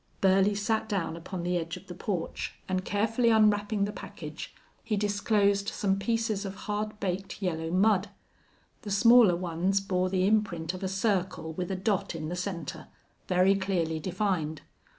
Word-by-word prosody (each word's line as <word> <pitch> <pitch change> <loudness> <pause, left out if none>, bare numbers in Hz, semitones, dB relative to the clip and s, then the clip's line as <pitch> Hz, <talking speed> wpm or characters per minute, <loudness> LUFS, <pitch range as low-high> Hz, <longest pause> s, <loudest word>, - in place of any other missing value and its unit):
Burley 195 +1 +4
sat 220 +2 -1
down 185 -6 -1
upon 170 +1 -6
the 175 0 0
edge 165 +1 -4
of - - -13
the 175 - -8
porch 180 -1 -4
and, 185 0 -1
carefully 225 +5 +1
unwrapping 210 -2 +3
the 205 - -3
package, - - -8 0.3
he 215 -2 -1
disclosed 205 -1 +2
some 195 -1 0
pieces 220 0 0
of 195 -1 -5
hard 210 0 -3
baked 195 -1 -3
yellow 165 -4 -2
mud. 195 +2 +3 0.7
The 215 - -7
smaller 225 -1 +6
ones 180 +2 0
bore 185 -1 0
the 185 0 +1
imprint 190 -6 +1
of 185 - -7
a 190 - -1
circle 190 -4 -1
with 180 +2 -4
a 190 - -1
dot 190 -2 -1
in 155 -1 -4
the 175 - -3
center, 180 -4 -5 0.4
very 185 +2 +4
clearly 180 -5 -1
defined. 175 -3 -2
195 Hz, 165 wpm, -29 LUFS, 180-210 Hz, 0.7 s, smaller